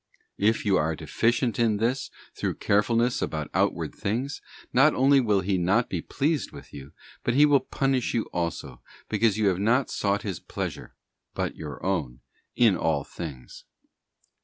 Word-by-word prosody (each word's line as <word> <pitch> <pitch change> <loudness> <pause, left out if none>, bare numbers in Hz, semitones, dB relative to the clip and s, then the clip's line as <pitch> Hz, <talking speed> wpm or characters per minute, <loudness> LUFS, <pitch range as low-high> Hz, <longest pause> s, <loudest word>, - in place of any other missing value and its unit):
If 110 +3 +2
you 100 -2 +3
are 80 +1 0
deficient 120 - 0
in 110 -3 +2
this 120 +5 -1 0.2
through - - -2
carefulness 115 +4 +1
about 75 -2 -3
outward - - 0
things, 125 +8 -3 0.3
not 150 +4 +5
only 135 +2 +5
will 105 -5 +2
He 95 0 0
not 100 +7 +1
be 90 - -2
pleased 150 - -1
with - - -13
you, 70 0 -10 0.3
but 120 - 0
He 145 +2 +7
will 145 -2 +5
punish 130 -1 -1
you 115 - +1
also, 85 -7 -4 0.3
because 110 -1 +2
you 105 -2 +3
have 90 -1 -1
not 120 +6 +2
sought 100 0 0
His 95 -6 -4
pleasure, - - -6 0.4
but - - -2
your 75 0 -8
own, 75 -11 -2 0.3
in 115 -5 +4
all 80 -5 0
things. 70 -7 -9
105 Hz, 160 wpm, -26 LUFS, 90-125 Hz, 0.4 s, He